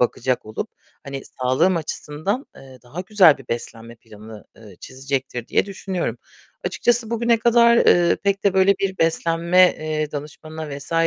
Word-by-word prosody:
bakacak 125 -1 0
olup 110 - -5 0.3
hani 140 -1 -6
sağlığım 130 +8 0
açısından, 160 - -4
eee, 130 -1 -14
daha 135 +9 -8
güzel 185 -6 +5
bir 130 - -15
beslenme 115 0 -5
planı, 110 0 -13
eee, 105 -5 -15
çizecektir, 130 -2 -5
diye - - +1
düşünüyorum. 190 -2 -4 0.5
Açıkçası 235 -2 +1
bugüne 235 0 +2
kadar, 235 0 +4
eee, 175 -6 +4
pek 200 0 0
de 200 -2 +2
böyle 190 +1 +4
bir 190 -1 -2
beslenme, 170 +2 +3
eee, 155 -1 -3
danışmanına 150 0 -7
vs. 145 +4 -6
155 Hz, 145 wpm, -21 LUFS, 130-190 Hz, 0.5 s, güzel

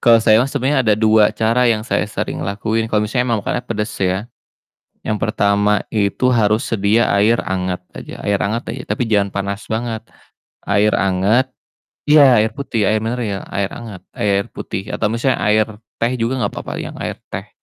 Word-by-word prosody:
kalau 115 -1 +7
saya 110 0 +4
mah 130 - +1
sebenernya 135 0 +1
ada 110 -4 +3
2 110 -1 +4
cara 115 +3 +2
yang 110 -2 +1
saya 110 - -1
sering 100 - -4
lakuin 110 +3 -2
kalo 105 -1 +1
misalnya 125 +3 -1
emang 110 -3 0
makannya 125 - -1
pedes 105 -1 -2
ya. 95 +2 0 0.8
Yang 105 - 0
pertama 105 -1 +1
itu 105 +3 0
harus 110 +1 +2
sedia 110 +2 +2
air 105 +4 +4
anget 90 -1 -1 0.2
aja - - -9
air 100 -1 +1
anget 110 +4 -1
aja, 125 - -7
tapi 125 - 0
jangan 100 -3 +1
panas 100 +1 -4
banget, 110 0 -2 0.6
air 100 +1 +2
anget 100 +7 +2 0.6
iya, 145 -5 +6
air 110 +1 +2
putih 115 -6 -2
air 110 +2 +2
mineral, 110 -4 -2
air 100 0 -1
hangat, 110 -6 -8
air 100 -1 0
putih. 95 +1 -5
Atau 105 - 0
misalnya 120 +3 0
air 105 0 +3 0.3
teh 120 +2 0
juga 125 +1 -1
nggak - - -3
papa, - - -6
yang - - -5
air - - -4 0.2
teh - - -5
110 Hz, 180 wpm, -18 LUFS, 100-115 Hz, 0.8 s, kalau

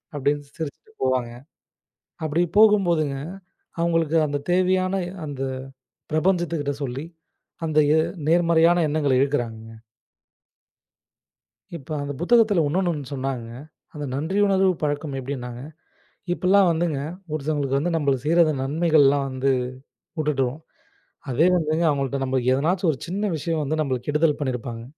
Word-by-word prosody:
அப்டினு 145 +1 0
சிரிச்சுட்டு 160 +7 -7
போவாங்க. 130 -2 0 0.9
அப்டி 155 +3 +1
போகும் 210 -3 +6
போதுங்க 155 -5 0 0.6
அவங்களுக்கு 165 -1 +1
அந்த 145 0 -2
தேவையான 185 +1 +2 0.3
அந்த 140 -3 -6 0.7
ப்ரபஞ்சத்துக்கிட்ட 165 -3 0
சொல்லி, 135 +4 -4 0.6
அந்த 155 -1 +2 0.2
எ - - +4 0.3
நேர்மறையான 170 0 +4
எண்ணங்கள 145 -3 +1
இழுக்கராங்கங்க. 115 -5 -2 2.0
இப்ப 140 +3 -13
அந்த 145 0 -4
புத்தகத்துல 215 -3 +4
இன்னோனு 180 +4 0
ஒண்ணு 145 -4 -5
சொன்னாங்க, 130 -3 -3 0.5
அந்த 150 -1 -5
நன்றி 160 +8 -1
உணர்வு 190 -1 +3
பழக்கம் 145 -1 -2
எப்டின்னாங்க. 125 -2 -6 0.7
இப்பெல்லாம் 190 +1 +4
வந்துங்க, 160 -3 -1 0.3
ஒருத்தங்களுக்கு 145 -2 -1
வந்து 175 +4 -1
நம்மளு 140 -4 +1
செய்ற 165 +3 +2
அந்த 155 -2 0
நன்மைகள்லாம் 145 -1 +3
வந்து 130 +1 0 0.7
உட்டுடுவோம். 145 -2 0 0.7
அதே 155 +8 +3
வந்துங்க 160 +1 0
அவங்கள்ட்ட 140 -1 -1
நம்ம 130 0 0
எதன்னாச்சு 170 +8 +1
ஒரு 140 - -5
சின்ன 200 +3 -1
விஷயம் 160 0 -2
வந்து 155 +2 -2
நம்மளுக்கு 130 -3 -2
கெடுதல் 150 0 +2
பண்ணிருப்பாங்க. 120 -4 -4
150 Hz, 120 wpm, -23 LUFS, 135-170 Hz, 2.0 s, போகும்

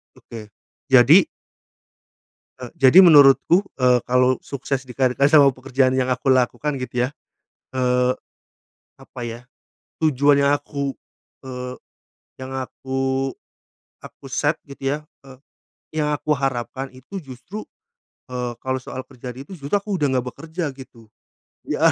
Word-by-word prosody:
Oke, 110 -3 -11 0.4
jadi 135 - +7 1.3
Eee, 125 -2 -9
jadi 135 +7 +6
menurutku, 145 +2 +6 0.2
eee, 125 -2 +3
kalau 125 +1 +3
sukses 135 -1 -4
di 130 -2 -12
karir 130 -2 +2
eh, 140 +1 +4
sama 145 -3 +6
pekerjaan 130 0 0
yang 130 -1 0
aku 125 +1 -2
lakukan 130 +4 0
gitu 125 -1 -1
ya. - - -4 0.7
Eee, 125 0 +2 0.9
apa - - -13
ya, 115 0 -6 0.6
tujuan 145 -2 +3
yang 140 - +4
aku, 140 -1 -2 0.5
eee, 125 -1 -7 0.7
yang 130 0 -7
aku 135 +1 -2 0.7
aku - - -14
set 145 +4 0
gitu 140 -1 -12
ya, 145 - -1 0.3
eee, 135 -2 -14 0.6
yang 150 - 0
aku 150 +1 -1
harapkan 135 -1 -2
itu 160 +10 -8
justru, 145 - -9 0.7
eee, 125 -1 -3
kalau 130 0 -2
soal 130 0 -7
kerjaan 125 -1 -10
itu 185 +6 -10
justru 140 -2 -9
aku 205 -1 0
udah 150 -4 +1
nggak 125 -1 0
bekerja 160 +2 -5
gitu. 115 -4 -14 0.6
Iya, - - +3
130 Hz, 135 wpm, -21 LUFS, 125-145 Hz, 1.3 s, jadi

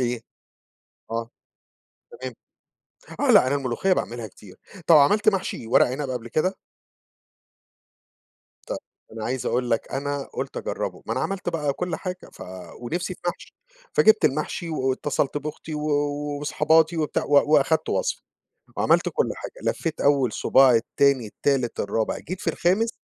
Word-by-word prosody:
إيه؟ 120 -1 -1 0.9
آه، 115 +1 -3 0.8
تمام، 130 -1 -7 0.9
آه - - +3
لأ - - +7
أنا 135 - +1
الملوخية 140 +7 0
باعملها 120 -9 -2
كتير، 95 -1 -15 0.3
طب 165 - +8
عملت 205 +10 +4
محشي 195 - 0
ورق 115 - +5
عنب 130 +2 -3
قبل 120 -2 -4
كده؟ 185 +9 0 2.1
طيب - - -3 0.3
أنا 110 -1 -6
عايز 125 0 -2
أقول 125 0 0
لك 115 - -1
أنا 140 +1 -2
قُلت - - -5
أجربه، - - -4
ما - - -2
أنا - - -1
عملت 195 -2 -3
بقى 150 -4 0
كل 180 +5 -3
حاجة 185 -1 -6
ف - - -11 0.4
ونفسي 175 +9 -3
في - - -22
محشي، 175 - -4 0.4
فجِبت 220 0 +5
المحشي 155 +4 0
واتصلت 135 0 -1
بأختي 155 +2 -7
و 150 0 -3 0.5
وصحاباتي 160 +3 +3
وبتاع، 155 -2 -1
و 145 +1 +4
وأخدت 150 +2 +3
وصفة - - -1 0.6
وعملت - - +3
كل 465 - 0
حاجة - - -8 0.2
لفيت 165 -3 -3
أول 140 -5 +3
صباع 130 -2 +5
التاني، 130 +2 +2
التالت، 130 +1 -1
الرابع، 110 +2 -1
جيت 185 +3 -7
في - - 0
الخامس 195 +7 +1
145 Hz, 145 wpm, -24 LUFS, 125-165 Hz, 2.1 s, طب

